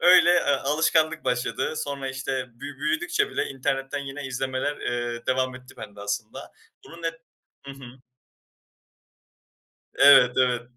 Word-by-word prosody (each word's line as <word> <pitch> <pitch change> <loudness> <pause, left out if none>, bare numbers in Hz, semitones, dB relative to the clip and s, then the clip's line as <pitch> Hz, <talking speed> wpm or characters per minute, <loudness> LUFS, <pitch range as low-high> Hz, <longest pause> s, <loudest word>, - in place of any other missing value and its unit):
Öyle, 175 0 +7
eee, 175 - +4
alışkanlık 155 +3 +1
başladı. 125 +4 -1
Sonra, 140 -3 -4
işte, 135 -1 -3
bü 140 +3 -9
büyüdükçe 350 - 0
bile - - -1
internetten 135 +1 -2
yine 135 0 -6
izlemeler, 130 +2 -2
eee, 120 -1 -3
devam 130 0 0
etti 130 0 -14
bende 105 0 -10
aslında. 105 +2 -5 0.3
Bunun 170 +1 -13
net 165 0 -2 0.5
Hı 140 - -7
hı. 130 -2 -12 2.0
Evet, 135 -3 +7
evet, 125 -2 +2
135 Hz, 130 wpm, -25 LUFS, 125-145 Hz, 2.0 s, Öyle